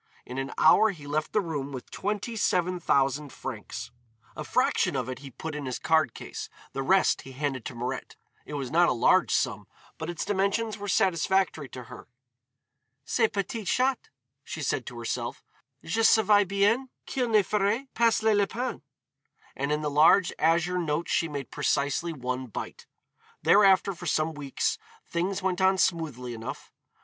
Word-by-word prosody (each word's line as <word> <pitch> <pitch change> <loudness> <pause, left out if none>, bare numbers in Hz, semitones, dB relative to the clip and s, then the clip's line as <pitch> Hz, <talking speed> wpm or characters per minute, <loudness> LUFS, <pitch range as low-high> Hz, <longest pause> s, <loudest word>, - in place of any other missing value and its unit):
In 125 +2 -5
an 135 +1 -3
hour 215 +7 +6
he 160 -8 -7
left 150 +2 -2
the 210 - +2
room 145 -6 -4
with 130 -2 -8
twenty 210 +3 -3
seven 180 -4 +1
thousand 140 -2 +1
francs. - - -7 0.4
A - - -5
fraction - - +1
of 130 -3 -1
it 130 0 -5
he 140 0 -9
put 160 +5 -7
in 145 -2 -5
his 130 - -3
card 160 -6 +2
case, - - -7 0.2
the 135 - -2
rest 190 +8 +3
he 135 - -11
handed 135 -3 -3
to 125 - -6
Mirette. 125 +2 -4 0.3
It 150 - -7
was 135 -3 -4
not 170 +1 +4
a - - +2
large 125 +9 +4
sum, 110 -8 0 0.3
but 160 +1 -4
its 175 - -3
dimensions 205 +2 0
were 205 - -5
satisfactory 185 -5 +1
to 125 - -8
her. - - -12 1.0
"Ce 225 - +2
p'tit 210 +1 -3
chat," 260 0 +1 0.3
she 155 - -6
said 130 -1 -1
to 120 - -7
herself, 115 -1 -4 0.4
"je 220 +7 -1
savais 210 -2 +5
bien 205 +7 +2 0.2
qu'il 250 -3 -1
ne 215 -2 +5
ferait 210 +7 0
pas 230 -1 +2
le 220 -1 +4
lapin." 215 +4 -1 0.7
And 140 +2 -2
of 150 0 0
the 150 - -1
large 165 +5 +5
azure 170 +3 +2
notes 165 0 -1
she 165 - +2
made 145 -3 -6
precisely 145 +3 0
one 130 -3 -4
bite. 110 - -7 0.6
Thereafter 195 -1 +5
for 175 0 -8
some 155 +1 +1
weeks 145 -3 -2 0.3
things 185 +3 -2
went 190 -1 0
on 190 0 +4
smoothly 150 -10 -1
enough. 115 0 -7
165 Hz, 170 wpm, -27 LUFS, 140-200 Hz, 1.0 s, hour